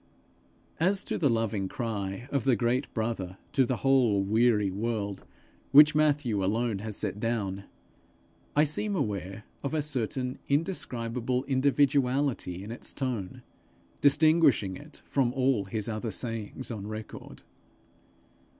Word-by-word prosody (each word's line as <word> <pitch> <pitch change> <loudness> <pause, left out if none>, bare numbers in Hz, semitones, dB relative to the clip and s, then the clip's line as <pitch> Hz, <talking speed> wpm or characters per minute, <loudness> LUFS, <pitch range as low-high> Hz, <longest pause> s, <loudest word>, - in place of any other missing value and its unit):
As 190 +4 +2
to - - -3
the 145 - +3
loving 110 -4 0
cry 105 -1 -4
of 140 -4 0
the 130 -3 +3
great 120 +5 0
brother 110 -5 -3
to 130 -2 +2
the 130 - 0
whole 120 -7 +4
weary 105 -1 +2
world 100 - -3 0.4
which 150 +2 +8
Matthew 145 -9 +1
alone 110 +1 0
has 105 0 -4
set 105 -1 -2
down, 100 -4 -2 0.9
I 150 - +5
seem 200 +7 +1
aware 100 - -3 0.2
of 140 +3 -3
a 155 - +1
certain 130 -2 -2
indescribable 125 -6 -1
individuality 135 -6 +1
in 105 - -7
its 120 - -5
tone, 120 -9 -4 0.6
distinguishing 145 - +4
it - - -13
from 130 -3 +1
all 130 -6 +1
his 105 +2 -3
other 110 0 -3
sayings 115 +3 -5
on 105 -3 -5
record. 110 0 -8
120 Hz, 130 wpm, -28 LUFS, 105-135 Hz, 0.9 s, which